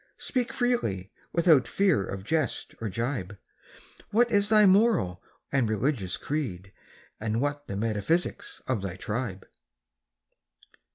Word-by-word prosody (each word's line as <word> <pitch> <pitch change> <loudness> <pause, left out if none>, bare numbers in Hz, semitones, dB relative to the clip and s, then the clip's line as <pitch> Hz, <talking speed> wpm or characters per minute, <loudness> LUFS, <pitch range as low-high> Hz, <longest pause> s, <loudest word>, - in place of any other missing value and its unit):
Speak 250 -1 -1
freely, 115 - -1 0.2
without 165 -6 +4
fear 190 - +2
of 95 0 -6
jest 155 +3 -1
or 110 - -2
gibe— 110 -2 -3 0.7
What 235 +2 +3
is 205 -1 +3
thy 215 -1 +6
moral 190 - +3 0.3
and 130 -5 +2
religious 110 -3 -1
creed? 100 - -4 0.5
And 110 +1 -1
what 145 +2 -2
the 100 - -4
metaphysics 115 - -1
of 130 -6 0
thy 95 -2 -4
tribe? 105 -2 -4
130 Hz, 120 wpm, -28 LUFS, -, 0.7 s, thy